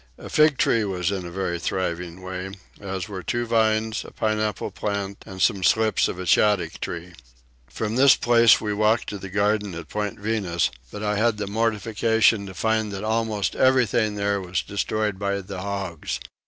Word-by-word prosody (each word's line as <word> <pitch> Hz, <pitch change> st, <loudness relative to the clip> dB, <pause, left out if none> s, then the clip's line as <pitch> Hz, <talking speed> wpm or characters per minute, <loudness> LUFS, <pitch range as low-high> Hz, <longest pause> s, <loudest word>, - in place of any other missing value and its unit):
A -, -, -10 dB
fig 150 Hz, -2 st, +4 dB
tree 115 Hz, -, +2 dB
was 95 Hz, -2 st, -1 dB
in 95 Hz, -3 st, -3 dB
a -, -, -7 dB
very 85 Hz, -1 st, -3 dB
thriving 90 Hz, 0 st, -3 dB
way, 95 Hz, +1 st, -5 dB, 0.3 s
as 95 Hz, 0 st, -4 dB
were 95 Hz, -3 st, -6 dB
two 120 Hz, +5 st, -2 dB
vines, 110 Hz, -1 st, +1 dB
a -, -, -10 dB
pineapple 110 Hz, -2 st, -1 dB
plant, 100 Hz, -1 st, -4 dB
and 95 Hz, -1 st, -9 dB
some 100 Hz, -1 st, +2 dB
slips 110 Hz, +3 st, +3 dB
of -, -, -5 dB
a 95 Hz, -, -5 dB
shaddock 90 Hz, -3 st, +2 dB
tree. 85 Hz, +1 st, -5 dB, 0.5 s
From 110 Hz, -, -3 dB
this 135 Hz, +1 st, +7 dB
place 115 Hz, -1 st, +5 dB
we 105 Hz, -1 st, -2 dB
walked 110 Hz, +2 st, +2 dB
to 100 Hz, -, -6 dB
the 95 Hz, -, -8 dB
garden 105 Hz, -1 st, 0 dB
at 85 Hz, -, -8 dB
Point 105 Hz, -1 st, -3 dB
Venus, 100 Hz, -5 st, 0 dB, 0.2 s
but 105 Hz, -, -6 dB
I 105 Hz, 0 st, 0 dB
had 110 Hz, 0 st, +2 dB
the 105 Hz, -, -3 dB
mortification 110 Hz, 0 st, +1 dB
to 95 Hz, -, -9 dB
find 110 Hz, 0 st, 0 dB
almost 110 Hz, 0 st, -1 dB
everything 120 Hz, -5 st, +3 dB
there 100 Hz, -1 st, 0 dB, 0.2 s
destroyed 105 Hz, 0 st, -2 dB
by 100 Hz, 0 st, -1 dB
the 95 Hz, -1 st, -7 dB
hogs. 95 Hz, -10 st, -4 dB
105 Hz, 175 wpm, -24 LUFS, 95-110 Hz, 0.5 s, this